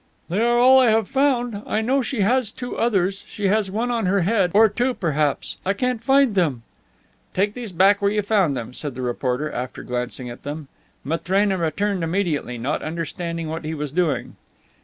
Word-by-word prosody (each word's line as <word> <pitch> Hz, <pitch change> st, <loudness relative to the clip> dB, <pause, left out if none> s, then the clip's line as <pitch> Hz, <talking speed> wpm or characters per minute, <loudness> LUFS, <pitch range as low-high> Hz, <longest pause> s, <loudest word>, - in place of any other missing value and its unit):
"They 190 Hz, +6 st, 0 dB
are 240 Hz, +1 st, +3 dB
all 260 Hz, +2 st, +7 dB
I 255 Hz, -3 st, +5 dB
have 220 Hz, -2 st, +2 dB
found. 245 Hz, -6 st, +1 dB
I 215 Hz, -, 0 dB
know 265 Hz, +5 st, +1 dB
she 250 Hz, -2 st, -2 dB
has 235 Hz, +2 st, +2 dB
two 245 Hz, +2 st, -6 dB
others. 195 Hz, -4 st, 0 dB
She 200 Hz, -2 st, -2 dB
has 210 Hz, -1 st, +1 dB
one 230 Hz, +5 st, -1 dB
on 230 Hz, -5 st, 0 dB
her 195 Hz, +1 st, +2 dB
head, 195 Hz, 0 st, +2 dB
or 220 Hz, +1 st, +7 dB
two, 245 Hz, +5 st, -1 dB
perhaps; 150 Hz, -5 st, -1 dB
I 195 Hz, -, +1 dB
can't 250 Hz, +1 st, -2 dB
find 270 Hz, -1 st, +4 dB
them." 150 Hz, -11 st, 0 dB, 0.7 s
"Take 205 Hz, +2 st, +1 dB
these 235 Hz, -4 st, -6 dB
back 195 Hz, +4 st, +4 dB
where 200 Hz, -, +3 dB
you 210 Hz, 0 st, 0 dB
found 190 Hz, -10 st, +2 dB
them," 120 Hz, +1 st, -6 dB
said 145 Hz, -1 st, -5 dB
the 130 Hz, -, -5 dB
reporter, 125 Hz, +4 st, -2 dB
after 125 Hz, +1 st, -5 dB
glancing 125 Hz, +1 st, -4 dB
at 120 Hz, 0 st, -9 dB
them. 145 Hz, 0 st, -6 dB, 0.3 s
Matrena 190 Hz, +6 st, 0 dB
returned 180 Hz, +3 st, -1 dB
immediately, 165 Hz, -8 st, -1 dB
not 125 Hz, +5 st, -2 dB
understanding 165 Hz, +1 st, -4 dB
what 160 Hz, +1 st, -5 dB
he 155 Hz, +1 st, -4 dB
was 150 Hz, -2 st, -4 dB
doing. 165 Hz, -2 st, -1 dB
195 Hz, 195 wpm, -22 LUFS, 155-225 Hz, 0.7 s, all